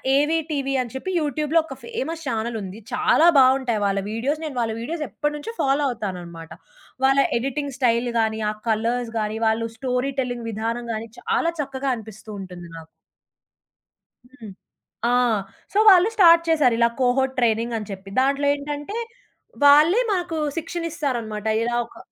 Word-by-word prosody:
'ఏవీ 300 +4 +2
టీవీ' 275 -2 -1
అని 240 -3 -7
చెప్పి 375 +8 -4
యూట్యూబ్‌లో 300 +2 +1
ఒక 270 -4 -9
ఫేమస్ 335 -9 -5
ఛానెల్ 230 -1 -2
ఉంది. 195 +2 -8
చాలా 330 - +4
బావుంటాయి 260 -4 +3
వాళ్ళ 195 0 +1
వీడియోస్ 275 +8 -2
నేను 295 - -6
వాళ్ళ 225 -1 -1
వీడియోస్ 310 +5 -3
ఎప్పటినుంచో 295 +8 -4
ఫాలో 275 +2 +2
అవుతాననమాట. 175 -8 -6 0.5
వాళ్ళ 270 +1 +4 0.2
ఎడిటింగ్ 275 +2 -3
స్టైల్ 240 -1 +2
గాని, 220 0 0
ఆ - - -6 0.2
కలర్స్ 230 +2 0
గాని, 215 +1 -2
వాళ్ళు 225 +1 0
స్టోరీ 255 +2 -1
టెల్లింగ్ 245 -2 -4
విధానం 230 +3 -3
గాని, 220 +1 -5
చాలా 335 - 0
చక్కగా 270 -1 -3
అనిపిస్తూ 220 -1 -11
ఉంటుంది 180 -2 -9
నాకు. 160 -1 -11 1.4
హ్మ్. 245 -5 -12 0.6
ఆ! - - +2 0.6
సో - - -1
వాళ్ళు 370 0 +7
స్టార్ట్ 335 -5 +7
చేశారు 285 -7 +3
ఇలా 235 0 +4
కోహోర్ట్ 260 +1 +2
ట్రైనింగ్ 230 0 +1
అని 210 -2 -7
చెప్పి. 195 0 -8
దాంట్లో 280 +1 +1
ఏంటంటే, 290 +8 -5 0.7
వాళ్ళే 305 +10 +6
మాకు 350 -3 -3 0.2
శిక్షణ 330 +1 -4
ఇస్తారనమాట 235 -9 -3 0.2
ఇలా 240 +1 -1
ఒక - - -18
255 Hz, 150 wpm, -23 LUFS, 225-295 Hz, 1.4 s, వాళ్ళు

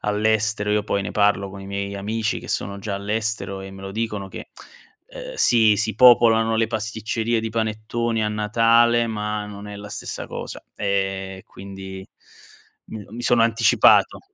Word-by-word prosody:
all'estero. 105 0 0
Io 105 0 +2
poi 100 -1 -1
ne 100 - -4
parlo 100 -1 +1
con 95 0 -10
i 95 - -9
miei 100 0 -4
amici 110 +2 -2
che - - -11
sono 100 0 -3
già 100 0 -4
all'estero 105 -1 -3
e 95 0 -8
me 95 0 -11
lo 95 - -7
dicono 105 -2 -3
che, - - -9 0.6
ehm, - - -9
si 110 - +4
si 110 0 -1
popolano 115 -2 +5
le 115 - +2
pasticcerie 110 +2 -2
di 110 0 -3
panettoni 110 +1 -2
a - - 0
Natale, 115 +2 +3
ma 105 -1 -3
non 105 0 -9
è 105 - -8
la 105 0 -9
stessa 105 - -6
cosa, - - -7
e 95 -1 -2
quindi 95 0 -9 0.8
m 110 -2 -8
mi 120 - -6
sono 120 -1 +3
anticipato. 115 0 +4
105 Hz, 165 wpm, -22 LUFS, 100-115 Hz, 0.8 s, popolano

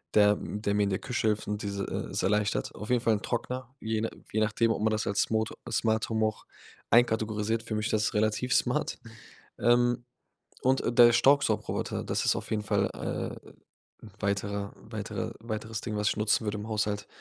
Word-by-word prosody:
der 105 -1 +6
der 105 0 -2
mir 105 0 +3
in 100 - +1
der 95 - -1
Küche 120 -3 -1
hilft 105 -1 0
und 105 0 -2
dieses 100 -1 -3 0.3
e - - 0
erleichtert. 105 0 +1
Auf 105 - -7
jeden 125 -1 +3
Fall 115 -1 +3
'n 105 - -4
Trockner, 125 +1 -3
je 110 0 -1 0.3
je 110 - +1
nachdem, 115 +2 +2
ob - - -1
man 110 - +3
das 110 0 0
als 100 0 +2
Smot 110 0 0 0.2
Smart-Home 110 0 +1
auch 110 - -3 0.5
einkategorisiert. 110 -1 +2
Für 110 -1 -4
mich 105 +1 -1
ist - - -2
das 105 0 +1
relativ 110 +4 +1
smart. 125 - +1 0.6
Ähm, 120 +1 +3 0.6
und 130 +1 +3 0.2
der 120 0 +9
Staubsaugerroboter, 140 +4 +2
das - - -1
ist - - +3
auf - - -5
jeden 105 -1 0
Fall, 105 - +1
äh, - - -5 0.6
'n 105 - -12
weiterer 100 0 -2
weiterer 110 +1 -5
weiteres 110 0 -4
Ding, 110 -3 -4
was 105 +1 +2
ich - - -2
nutzen 105 +1 +2
würde 105 0 -1
im 105 - -6
Haushalt. 105 -1 -1
110 Hz, 190 wpm, -29 LUFS, 105-115 Hz, 0.6 s, der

